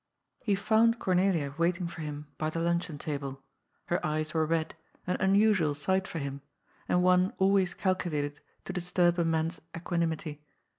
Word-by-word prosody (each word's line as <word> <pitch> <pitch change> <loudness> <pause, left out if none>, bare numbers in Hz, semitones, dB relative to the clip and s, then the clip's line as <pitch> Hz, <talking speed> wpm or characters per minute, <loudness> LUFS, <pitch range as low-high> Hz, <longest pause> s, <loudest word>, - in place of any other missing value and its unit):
Hb 200 -2 +3
found 220 +3 +3
Cornelia 180 -8 +1
waiting 175 +1 +1
for 170 -1 -6
him 150 -1 -5
by 155 - 0
the 155 - -5
luncheon 170 -1 0
table. 140 -3 -5 0.4
Her 175 - -1
eyes 155 0 -1
were 160 -1 +2
red, 160 0 0 0.3
an 180 - 0
unusual 190 -5 +3
sight 190 +6 0
for - - -5
him, 140 -2 -4 0.5
and 180 0 +3
one 185 +1 +4
always 190 -2 +3
calculated 150 -6 -1 0.3
to - - -5
disturb 175 -1 +2
a - - +3
man's 165 +1 0 0.2
equanimity. 165 -3 -2
170 Hz, 155 wpm, -30 LUFS, 155-185 Hz, 0.5 s, one